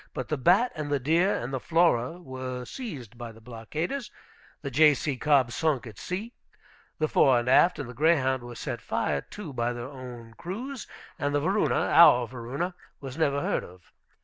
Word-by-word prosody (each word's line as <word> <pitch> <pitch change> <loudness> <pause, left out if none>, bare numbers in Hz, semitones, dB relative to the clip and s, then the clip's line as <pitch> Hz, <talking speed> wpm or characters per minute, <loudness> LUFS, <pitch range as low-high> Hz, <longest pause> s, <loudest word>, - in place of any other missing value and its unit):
But 130 - -4
the 155 - 0
Bat 185 - +4
and 150 -3 -5
the 145 - +2
Deer 165 +9 +2
and 120 +3 -4
the 130 - -1
Flora 165 -1 +2
were 130 -5 -6
seized 135 - -8
by 120 -1 -6
the 110 - -16
blockaders, 150 - -5 0.5
the 140 - -4
J.C. 150 -2 +4
Cobb 135 -2 +3
sunk 140 0 0
at 110 -4 -10
sea, 210 +7 -5 0.6
the 155 - +1
Fore 135 -4 +4
and 120 +1 -1
Aft 170 +7 +5
and - - -5
the 125 - -8
Greyhound 130 -2 +2
were 120 0 -9
set - - -5
fire 70 -1 -1
to 180 - -9
by 120 0 -1
their 120 0 -6
own 125 -4 -10
crews, 230 - -6 0.3
and 145 0 0
the - - +3
Varuna 190 +8 +1 0.2
(our 125 -7 +7
Varuna) 130 +9 -4 0.3
was 135 -2 -7
never 145 -3 +1
heard - - -1
of. 90 0 -15
135 Hz, 185 wpm, -27 LUFS, 120-165 Hz, 0.6 s, our